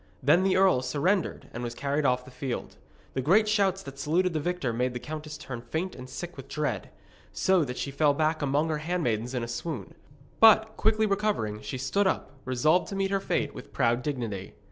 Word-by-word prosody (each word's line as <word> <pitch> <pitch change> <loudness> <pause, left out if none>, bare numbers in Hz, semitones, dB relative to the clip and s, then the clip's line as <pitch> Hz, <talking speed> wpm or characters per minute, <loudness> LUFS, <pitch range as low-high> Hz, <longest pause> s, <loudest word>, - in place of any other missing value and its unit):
Then 150 +7 +5
the 190 -1 +3
earl 190 -9 +4
surrendered 165 +9 0
and 120 - -5
was 120 -1 -4
carried 140 +3 -1
off 125 0 +1
the 130 - -12
field. 130 -1 -4 0.4
The 130 - -1
great 195 - +4
shouts 195 -3 +2
that 140 0 -10
saluted 170 +5 +1
the 155 - 0
victor 150 -6 -1
made 125 +2 -1
the - - -2
countess 155 +1 -6
turn 125 -3 -7
faint 160 +10 -3
and 130 0 -9
sick 175 +6 -7
with 135 0 -9
dread, 135 -10 -2 0.4
so 190 -3 +3
that 125 -3 -5
she 140 - -3
fell 145 +1 +3
back 155 +1 +1
among 145 +3 +1
her 155 -1 -1
handmaidens 130 -8 -1
in 125 - -1
a - - -3
swoon. 120 - -5 0.5
But, 220 0 +6
quickly 220 0 +2
recovering, 200 - 0
she 105 +5 -5
stood 190 +10 +1
up, 190 - -1
resolved 155 +8 +2
to 195 - -5
meet 195 0 0
her 195 - +2
fate 145 -6 -1
with - - -11
proud 120 -2 +2
dignity. 115 -9 -4
150 Hz, 210 wpm, -28 LUFS, 125-185 Hz, 0.5 s, But